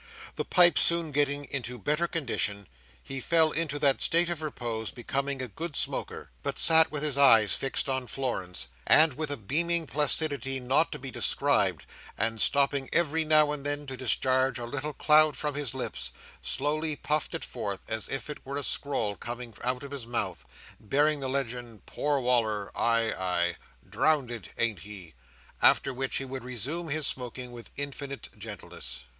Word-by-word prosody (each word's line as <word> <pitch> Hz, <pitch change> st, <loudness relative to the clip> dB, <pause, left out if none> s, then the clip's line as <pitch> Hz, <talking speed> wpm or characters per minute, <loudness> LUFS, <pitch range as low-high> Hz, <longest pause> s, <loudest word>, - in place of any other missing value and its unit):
The -, -, -3 dB
pipe 175 Hz, -2 st, +5 dB
soon 170 Hz, -2 st, +1 dB
getting 145 Hz, 0 st, 0 dB
into 125 Hz, -2 st, -3 dB
better 150 Hz, -, -1 dB
condition, 105 Hz, -, -2 dB, 0.4 s
he 135 Hz, 0 st, -5 dB
fell 160 Hz, +2 st, +4 dB
into 155 Hz, -3 st, 0 dB
that 140 Hz, -2 st, +2 dB
state 170 Hz, +1 st, +4 dB
of 165 Hz, -2 st, -5 dB
repose 120 Hz, -7 st, -5 dB
becoming 135 Hz, +2 st, -3 dB
a -, -, -4 dB
good 160 Hz, -, -6 dB
smoker; -, -, -3 dB
but -, -, -4 dB
sat 160 Hz, 0 st, +8 dB
with 150 Hz, -1 st, -2 dB
his 145 Hz, -2 st, +2 dB
eyes 115 Hz, -7 st, +6 dB
fixed 135 Hz, +1 st, -1 dB
on 130 Hz, -2 st, -2 dB
Florence, 120 Hz, -10 st, -4 dB, 0.2 s
and, 155 Hz, -2 st, +6 dB
with 155 Hz, +3 st, -4 dB
a 145 Hz, -, -1 dB
beaming 165 Hz, -, +3 dB
placidity 145 Hz, -2 st, +2 dB
not 130 Hz, +6 st, +1 dB
to -, -, -5 dB
be 130 Hz, 0 st, -7 dB
described, -, -, +2 dB, 0.3 s
and 115 Hz, -1 st, 0 dB
stopping 140 Hz, -1 st, +2 dB
every 160 Hz, -1 st, +3 dB
now 155 Hz, -1 st, +4 dB
and 150 Hz, -2 st, -5 dB
then 145 Hz, 0 st, -2 dB
to 135 Hz, -1 st, -6 dB
discharge 130 Hz, 0 st, +1 dB
a 120 Hz, -, -5 dB
little 145 Hz, +4 st, -4 dB
cloud 155 Hz, +1 st, +3 dB
from 150 Hz, -1 st, -2 dB
his 145 Hz, -4 st, -4 dB
lips, -, -, -4 dB, 0.3 s
slowly 155 Hz, +2 st, 0 dB
puffed 150 Hz, +1 st, -2 dB
it -, -, -4 dB
forth, 105 Hz, -5 st, -5 dB
as 110 Hz, -1 st, -2 dB
if 135 Hz, -, -1 dB
it 150 Hz, -, -7 dB
were 140 Hz, +1 st, -6 dB
a 145 Hz, -, -3 dB
scroll 125 Hz, -8 st, 0 dB
coming 120 Hz, +1 st, -7 dB
out 125 Hz, +2 st, -2 dB
of 140 Hz, -, -9 dB
his 135 Hz, -5 st, -6 dB
mouth, 100 Hz, -7 st, -3 dB, 0.3 s
bearing 145 Hz, +7 st, +1 dB
the 135 Hz, -1 st, -3 dB
legend 120 Hz, -5 st, -5 dB
"Poor 145 Hz, -1 st, -1 dB
Wal"r, 115 Hz, -5 st, 0 dB
ay, 115 Hz, -1 st, +1 dB
ay. 85 Hz, -2 st, -1 dB, 0.3 s
Drownded, 130 Hz, -7 st, -1 dB
ain't 115 Hz, -5 st, -1 dB
he?" 95 Hz, -2 st, -11 dB, 0.5 s
after 135 Hz, -, +5 dB
which 130 Hz, +1 st, -1 dB
he 135 Hz, -, -3 dB
would 130 Hz, -1 st, -7 dB
resume 130 Hz, -, -3 dB
his 150 Hz, +1 st, -1 dB
smoking 125 Hz, -1 st, -2 dB
with 120 Hz, -1 st, -11 dB
infinite 140 Hz, -1 st, -6 dB
gentleness. 100 Hz, -, -7 dB
135 Hz, 175 wpm, -27 LUFS, 120-150 Hz, 0.5 s, sat